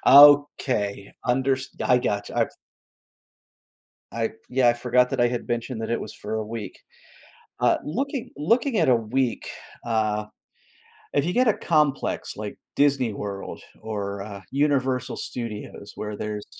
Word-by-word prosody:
Okay. 140 -8 +6
Unders 130 +1 +1 0.2
I 125 - +5
gotcha, 100 -4 -2
I've - - +1 1.6
I 115 +1 -1 0.2
yeah, 125 -1 +4
I 120 - +4
forgot 125 +1 +2
that 135 - -2
I 120 - +5
had 120 0 -3
mentioned 120 0 -2
that 110 - -3
it 115 - 0
was 110 - -7
for 110 +1 -5
a 110 - -2
week. 110 -1 -6 0.8
Uh, - - +4
looking 260 - -2
looking 230 - +2
at - - +3
a 125 - +6
week, 120 +2 -1 0.4
uh, 110 -2 0 0.9
if 145 - +3
you 175 - -1
get 250 0 +3
a 215 - +5
complex 150 -5 0
like 105 -1 -6 0.2
Disney 135 -5 +3
World 100 -1 -6 0.2
or, 100 -2 -4
uh, 100 -1 -7
Universal 130 -3 +1
Studios, 105 -3 -6
where 105 -1 -5
there's 105 -1 -4
120 Hz, 145 wpm, -25 LUFS, 105-140 Hz, 1.6 s, Okay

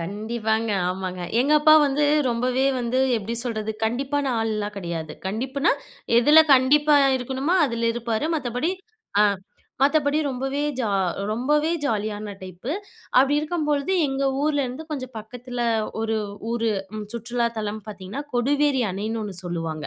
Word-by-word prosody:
கண்டிப்பாங்க. 220 +4 -2 0.2
ஆமாங்க. 185 -1 -4 0.2
எங்க 280 +4 +2
அப்பா 310 +1 +7
வந்து 285 +2 +1 0.3
ரொம்பவே 250 +3 0 0.2
வந்து, 245 +2 0 0.2
எப்படி 225 +2 -4
சொல்றது? 220 -3 -2
கண்டிப்பான 275 +5 -1
ஆள்லாம் 210 -2 -2
கெடையாது. 170 -4 -4
கண்டிப்புன்னா, 260 - 0 0.5
எதுல 295 +6 +7
கண்டிப்பா 290 +3 +4 0.2
இருக்கணுமோ 265 +6 -1
அதுல 235 -2 -1
இருப்பாரு. 235 +2 -1
மத்தபடி 250 +4 -1 0.5
அ - - +7 0.6
மத்தபடி, 285 +1 +3
ரொம்பவே 270 +2 -2 0.2
ஜா 230 - 0 0.4
ரொம்பவே 295 +8 +1
ஜாலியான 210 -4 -2
டைப்பு. 185 +8 -7 0.5
அப்படி 270 +3 +5
இருக்கும்பொழுது, 300 0 -1 0.2
எங்க 270 0 -2 0.2
ஊரிலேருந்து 290 -1 -1
கொஞ்சம் 260 -4 -5
பக்கத்தில 245 +3 -8 0.4
ஒரு 225 0 0 0.3
ஊரு 230 -1 0 0.3
ம் 215 - -4
சுற்றுலா 235 +1 -1
தலம் 215 0 -3
பார்த்தீங்கன்னா, 200 +6 -6
கொடுவேரி 280 +2 +2
அணைன்னு 215 +4 -3
ஒண்ணு 205 -3 -5
சொல்லுவாங்க. 165 -3 -4
240 Hz, 125 wpm, -24 LUFS, 215-280 Hz, 0.6 s, அப்பா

